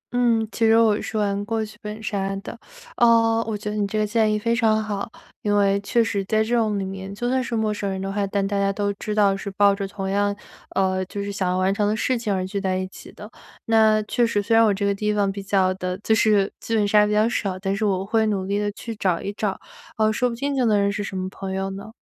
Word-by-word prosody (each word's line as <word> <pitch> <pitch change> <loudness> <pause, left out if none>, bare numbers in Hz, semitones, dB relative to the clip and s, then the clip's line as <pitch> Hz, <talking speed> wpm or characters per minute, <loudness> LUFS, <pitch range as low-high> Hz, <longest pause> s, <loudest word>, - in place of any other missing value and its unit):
嗯， 230 -2 +2
其 230 - -2
实 225 0 +5
我 220 -2 +3
是 220 - -4
玩 200 -1 0
过 220 +1 -2
剧 215 0 -13
本 210 0 -7
杀 195 -2 -2
的。 - - -7 0.4
呃， 230 -1 +4
我 220 -2 -2
觉 210 0 -5
得 - - -4
你 205 -1 0
这 215 - -3
个 215 - +2
建 215 0 +2
议 215 - +1
非 230 +2 0
常 220 -2 +2
好， 210 +1 -4 0.3
因 205 -1 +1
为 200 -1 +3
确 230 +4 +2
实 200 -2 -1
在 215 +2 +2
这 235 +2 0
种 215 -3 +1
里 195 - -2
面 190 0 -6
就 240 +4 -3
算 260 +1 +1
是 235 -1 -3
陌 220 -1 0
生 205 -1 -3
人 190 -1 -3
的 195 0 -3
话， 200 0 0
但 195 0 -1
大 200 0 -1
家 195 0 +2
都 205 0 -1
知 210 - -3
道 200 -2 +4
是 195 +1 -5
抱 200 0 +5
着 195 0 -3
同 195 -1 -5
样， 200 +1 +1 0.4
呃， 185 -1 +1
就 200 +2 -5
是 200 - -4
想 190 -2 -1
要 180 - 0
完 185 +1 +2
成 205 +1 0
的 215 - +1
事 255 +4 0
情 230 -3 -2
而 185 -1 0
聚 195 +1 -3
在 185 -1 0
一 185 0 -2
起 - - -12
的。 210 - -10 0.4
那 220 -1 +4
确 240 +3 0
实 210 - 0
虽 205 +3 +1
然 225 - +6
我 215 - +4
这 200 +1 -1
个 200 - +2
地 210 +1 -1
方 200 -1 +1
比 200 +1 -6
较 190 -1 +1
的 185 -1 -4
就 220 - +2
是 210 -3 +3
剧 225 - -2
本 210 -2 +2
杀 210 0 +4
比 210 - -2
较 215 +1 +3
少， 200 -5 -2
但 195 +1 -2
是 205 - -3
我 190 -2 0
会 220 +1 +1
努 195 -3 -1
力 200 +1 -1
地 205 0 -1
去 230 +2 -7
找 185 -5 0
一 200 - -5
找， 205 -1 -2 0.4
呃， 215 0 +2
说 250 +3 +1
不 235 - -5
定 280 +3 -2
就 260 - +1
能 210 -2 +3
认 200 0 +2
识 205 0 -3
什 195 -1 -5
么 185 0 -2
朋 195 -1 -6
友 195 0 -2
呢？ 195 +3 -8
205 Hz, 305 characters per minute, -23 LUFS, 195-220 Hz, 0.4 s, 然